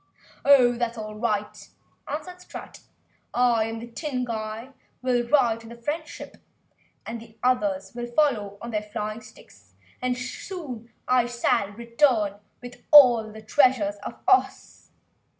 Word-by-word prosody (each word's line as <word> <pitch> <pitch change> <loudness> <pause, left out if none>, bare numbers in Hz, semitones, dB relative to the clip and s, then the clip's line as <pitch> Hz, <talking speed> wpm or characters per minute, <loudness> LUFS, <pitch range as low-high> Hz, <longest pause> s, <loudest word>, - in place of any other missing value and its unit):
"Oh, 270 -4 +6
that's 240 -1 -2
all 215 -1 -6
right!" 210 -2 -3 0.4
answered 360 +5 -6
Strut, - - -10 0.6
"I 240 -2 +3
and 225 0 -5
this 235 - -10
Tin 270 -2 -3
Emperor 220 +3 -5 0.3
will 245 -2 +1
ride 235 -4 +3
in 225 - -12
the 235 - -9
Friend 295 +7 -4
ship, - - -10 0.7
and 230 0 -6
the 225 -1 -16
others 200 -6 +1
will 240 0 -5
follow 235 -7 +1
on 235 - -5
their 210 -1 -1
flying 210 +1 -5
sticks 100 - -18 0.3
and 250 0 0
soon 250 - -7 0.2
I 250 -1 +4 0.4
will 200 - -12
return 230 -3 +1 0.2
with 245 0 -10
all 240 -7 +8
the 220 0 -11
treasures 220 -4 +3
of 205 - -8
Ohs!" 385 0 +1
235 Hz, 145 wpm, -25 LUFS, 215-255 Hz, 0.7 s, all